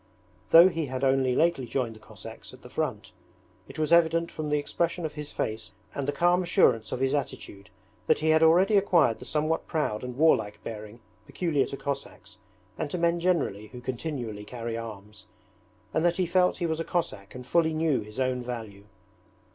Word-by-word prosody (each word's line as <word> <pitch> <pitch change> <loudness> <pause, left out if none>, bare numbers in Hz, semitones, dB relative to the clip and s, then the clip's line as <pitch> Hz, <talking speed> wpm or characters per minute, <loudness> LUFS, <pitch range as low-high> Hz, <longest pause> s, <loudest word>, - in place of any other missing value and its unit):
Though 170 +2 +9
he 165 -4 -2
had 130 +1 -4
only 130 -1 +2
lately 165 -6 +2
joined 115 -1 -2
the - - -14
Cossacks 105 - -11
at - - -21
the - - -12
front, - - -3 0.6
it - - -11
was 155 +1 +1
evident 165 0 +3
from 155 -1 -4
the 150 - +2
expression 170 +3 -2
of 155 - -4
his 150 -1 -7
face 110 -1 -4 0.2
and 140 -1 -3
the - - +2
calm 175 +5 +3
assurance 170 - +2
of - - -3
his 135 +1 +1
attitude 105 -8 -4 0.4
that 155 - +4
he 160 +1 0
had 160 0 +5
already 180 +6 +5
acquired 175 - +3
the - - -10
somewhat 155 +1 -1
proud 140 -9 -1
and 125 0 -6
warlike 110 -9 +3
bearing 110 +1 -8 0.3
peculiar 155 -7 0
to 140 - -6
Cossacks 140 0 -6 0.4
and 150 - -2
to 180 - -3
men 170 0 +1
generally 160 - 0
who 125 +3 -10
continually 125 -4 -5
carry 115 +1 -5
arms, 110 -2 -9 0.7
and 160 - +1
that 175 0 +2
he 185 - +1
felt 180 +1 +2
he 175 - -2
was 160 -1 -1
a - - -1
Cossack 115 - -3
and 125 0 -8
fully 160 +5 +2
knew 155 -3 +1
his 105 +3 -9
own 130 -1 0
value. 110 -5 -7
145 Hz, 195 wpm, -27 LUFS, 115-165 Hz, 0.7 s, Though